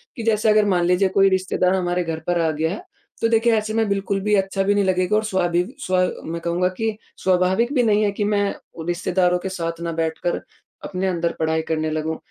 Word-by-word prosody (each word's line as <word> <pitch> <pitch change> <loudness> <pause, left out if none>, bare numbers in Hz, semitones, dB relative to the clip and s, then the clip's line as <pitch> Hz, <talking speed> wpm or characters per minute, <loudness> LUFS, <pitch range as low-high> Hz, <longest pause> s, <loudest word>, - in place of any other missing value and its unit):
कि, 230 - -5
जैसे 220 -1 +2
अगर 215 0 +4
मान 180 -4 +2
लीजिए 180 +2 +3
कोई 195 +1 +4
रिश्तेदार 185 0 +1
हमारे 180 -1 0
घर 165 -1 -4
पर 175 -1 +1
आ 165 - +2
गया 160 +2 -1
है, 200 - -6 0.4
तो 230 - +3
देखिए 230 0 +3
ऐसे 215 0 -2
में 225 -1 +1
बिल्कुल 200 0 -1
भी 210 +1 0
अच्छा 195 0 0
भी 200 +1 +2
नहीं 205 - +3
लगेगा 185 +2 +1
और 215 - +2
स्वाभावि 175 -4 +1 0.2
स्वा 185 0 +1 0.2
मैं 165 +1 -4
कहूँगा 170 +2 0
कि 220 -1 -1 0.3
स्वाभाविक 185 +7 +2
भी 255 -4 +3
नहीं 215 -2 +3
है 205 - +2
कि - - +2
मैं 205 0 +1 0.4
रिश्तेदारों 180 0 +1
के 190 +1 -4
साथ 165 -2 -4
ना 170 - -2
बैठ 160 0 -1
कर 175 - -1 0.4
अपने 190 0 -2
अंदर 170 -2 0
पढ़ाई 160 0 +1
करने 155 -1 0
लगूँ। 155 +1 -2
185 Hz, 225 wpm, -22 LUFS, 170-205 Hz, 0.4 s, अगर